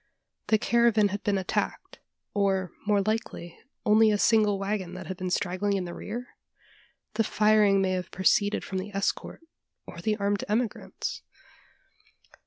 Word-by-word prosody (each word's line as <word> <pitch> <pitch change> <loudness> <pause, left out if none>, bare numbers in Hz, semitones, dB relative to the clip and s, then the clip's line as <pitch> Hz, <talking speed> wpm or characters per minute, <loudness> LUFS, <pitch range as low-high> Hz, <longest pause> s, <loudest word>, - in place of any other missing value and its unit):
The 220 - +4
caravan 225 -2 +3
had 200 +1 -4
been 205 -1 +1
attacked, 190 -1 -3 0.3
or, 195 -3 +1 0.2
more 205 -2 +3
likely, 215 -5 -3 0.3
only 215 0 +5
a 210 - +2
single 210 -1 +3
waggon 195 -2 -3
that 185 0 -7
had 185 - -5
been 185 0 -4
straggling 185 +2 0
in 185 - -3
the 175 - -6
rear? 240 +4 -6 0.8
The 225 +1 +2
firing 210 -2 +4
may 185 - +1
have 185 -1 -2
proceeded 205 +2 +2
from 190 - -3
the 200 +2 -6
escort, 200 +10 -2 0.4
or 170 - -9
the 215 +3 0
armed 200 -1 0
emigrants? 235 - -2
205 Hz, 150 wpm, -27 LUFS, 190-215 Hz, 0.8 s, only